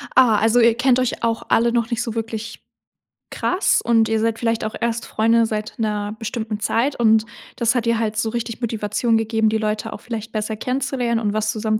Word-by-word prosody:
Ah, 240 -5 +6
also, 225 +2 +3
ihr 230 -1 +5
kennt 255 +1 +3
euch 255 -2 -2
auch 230 -1 0
alle 235 +1 +3
noch 235 -1 0
nicht 235 0 -1
so 230 -2 -4
wirklich 225 -1 -5 0.7
krass 365 +3 +1
und 225 -2 +2
ihr 220 -1 +1
seid 225 0 0
vielleicht 230 -2 0
auch 215 - -4
erst 235 0 -1
Freunde 230 +1 +2
seit 215 0 -4
'ner 210 -1 -2
bestimmten 225 -1 -4
Zeit. 245 +6 0
Und, 220 -1 +4 0.3
das 235 0 +1
hat 240 -2 0
dir 230 -1 +1
halt 220 -1 -1
so 220 0 0
richtig 235 0 -4
Motivation 225 0 0
gegeben, 220 0 +1
die 220 - +1
Leute 215 0 -2
auch - - -9
vielleicht 225 -2 -6
besser 215 0 -2
kennenzulernen 250 -1 -1
und 210 -2 -1
was 215 0 0
zusammen 215 0 -1
225 Hz, 210 wpm, -21 LUFS, 220-235 Hz, 0.7 s, Ah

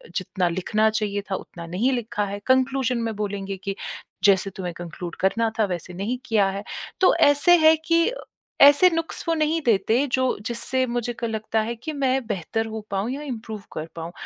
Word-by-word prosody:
जितना 185 -1 -1
लिखना 215 +5 +1
चाहिए 210 -2 -1
था - - +1
उतना 170 -2 -8
नहीं 200 +10 0
लिखा 230 -4 -2
है। 200 0 -5
कन्क्लूज़न 260 -1 +2
में 225 -2 -2
बोलेंगे 200 -1 -4
कि 195 0 -3 0.5
जैसे 195 -1 +4
तुम्हें 180 -2 -4
कन्क्लूड 175 0 -7
करना 225 +4 +1
था 215 - +4
वैसे 180 -1 -5
नहीं 205 +7 -3
किया 210 -3 +3
है। 200 +1 -5 0.4
तो 370 - +6
ऐसे 290 +5 +6
हैं 315 -1 +6
कि 335 +7 +3 0.5
ऐसे 290 +6 +8
नुक्स 330 -1 -2
वो 330 - +2
नहीं 315 +1 +1
देते 225 +5 +3
जो 260 -1 +2 0.2
जिससे 250 +2 +1
मुझे 240 0 -2
लगता 220 0 -1
है 235 +2 -3
कि 275 +7 -6
मैं 265 -2 0
बेहतर 220 +3 -2
हो 220 0 -5
पाऊँ 200 +4 -1
या 285 +2 -4
इम्प्रूव 220 -6 -6
कर 155 - -4
पाऊँ, 165 0 -6
220 Hz, 185 wpm, -24 LUFS, 195-260 Hz, 0.5 s, ऐसे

